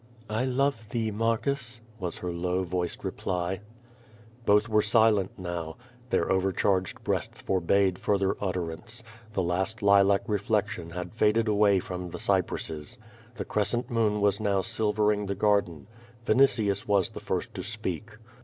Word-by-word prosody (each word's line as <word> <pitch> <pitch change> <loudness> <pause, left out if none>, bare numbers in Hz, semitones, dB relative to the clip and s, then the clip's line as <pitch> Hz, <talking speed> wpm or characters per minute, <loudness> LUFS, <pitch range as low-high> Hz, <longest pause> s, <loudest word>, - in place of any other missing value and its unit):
"I 110 +4 0
love 130 -4 0
thee, 110 -1 -1
Marcus," 115 +3 -1 0.2
was 90 -3 -4
her 90 - -4
low 90 +2 -1
voiced 90 -1 -3
reply. 90 +1 -2 0.9
lioth 105 +2 +5
were 110 -1 +3
silent 105 -2 +3
now. 85 -3 -5 0.3
Their - - +1
overcharged 95 0 +1
breasts - - -2
forbade 95 0 +1
further 100 -2 +1
utterance. 90 +6 -3 0.3
The 95 - 0
last 95 +6 -1
lilac 100 0 +5
reflection 105 -4 -1
had 90 +1 -6
faded 110 +1 +2
away 105 -2 +4
from 90 0 -5
the - - -6
cypresses. 80 +9 -1 0.4
The 100 -4 -4
crescent 120 +4 -1
moon 110 -3 +1
was 100 -1 +3
now 100 -3 +1
silvering 105 -2 +1
the 100 - -2
garden. 100 -6 +1 0.4
Vinitius 110 -5 +3
was 100 -3 +2
the - - -7
first - - -3
to - - -5
speak. 105 0 -1
100 Hz, 140 wpm, -28 LUFS, 90-110 Hz, 0.9 s, lioth